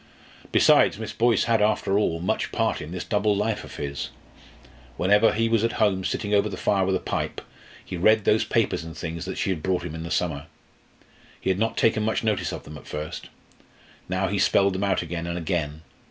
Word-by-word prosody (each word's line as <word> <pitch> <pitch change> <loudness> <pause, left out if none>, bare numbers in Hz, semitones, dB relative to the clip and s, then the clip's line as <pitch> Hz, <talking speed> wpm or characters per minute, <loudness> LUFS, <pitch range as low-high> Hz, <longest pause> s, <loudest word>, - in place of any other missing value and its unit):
Besides, - - +5
Miss - - -6
Boyce 115 -3 +3
had, 115 -2 +2
after 105 -1 +2
all, 85 -6 0
much 90 - -1
part - - 0
in 75 - -7
this 90 0 -4
double 105 -1 +1
life 105 +1 -1
of - - -10
his. 70 -1 -4 0.9
Whenever 105 +4 +4
he 115 +1 +1
was 115 -1 +2
at 115 - +1
home, 100 -4 +1
sitting 105 +2 -2
over 105 +1 +3
the - - -6
fire 95 -2 +1
with 95 - +2
a - - 0
pipe, - - -3 0.5
he 90 - -5
read 110 +4 +4
those 110 - +4
papers - - 0
and 80 0 -9
things 85 +2 -5
she 95 - 0
had 85 -5 -3
brought 95 0 0
him 80 - -5
in 80 - -6
the 85 - -6
summer. 80 -5 -1 0.9
He 95 - 0
had 95 - -1
not 115 +1 0
taken 110 -1 +3
much 110 +1 0
notice 110 -1 0
of - - -6
them 75 0 -10
at - - -17
first. 75 0 -6 0.8
Now 95 +1 0
he 100 0 -1
spelled 100 0 +3
them 95 +2 -2
out 100 -3 +1
again 85 0 -4
and 85 0 -3
again. 80 -3 -2
95 Hz, 210 wpm, -25 LUFS, 85-105 Hz, 0.9 s, Besides